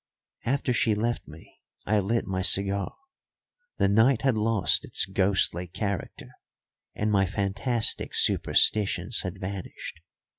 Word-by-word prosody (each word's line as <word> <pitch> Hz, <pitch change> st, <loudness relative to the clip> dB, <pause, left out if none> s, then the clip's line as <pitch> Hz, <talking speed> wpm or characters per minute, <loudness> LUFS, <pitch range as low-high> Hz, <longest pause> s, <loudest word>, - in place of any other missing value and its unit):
After 130 Hz, 0 st, 0 dB
she 110 Hz, -2 st, +2 dB
left 115 Hz, +3 st, -2 dB
me 75 Hz, +1 st, -15 dB, 0.2 s
I 105 Hz, -1 st, +2 dB
lit 115 Hz, +4 st, 0 dB
my 95 Hz, -1 st, -2 dB
cigar. 100 Hz, +1 st, 0 dB, 0.8 s
The -, -, +3 dB
night 110 Hz, +5 st, +3 dB
had 135 Hz, -4 st, +3 dB
lost 105 Hz, -6 st, +2 dB
its -, -, +1 dB
ghostly 95 Hz, -2 st, +1 dB
character 100 Hz, +2 st, -5 dB, 0.6 s
and 105 Hz, +1 st, -1 dB
my 95 Hz, -2 st, +3 dB
fantastic 100 Hz, +4 st, -1 dB
superstitions 105 Hz, +2 st, +2 dB
had 95 Hz, 0 st, -6 dB
vanished. 95 Hz, -1 st, -7 dB
100 Hz, 120 wpm, -27 LUFS, 95-110 Hz, 0.8 s, The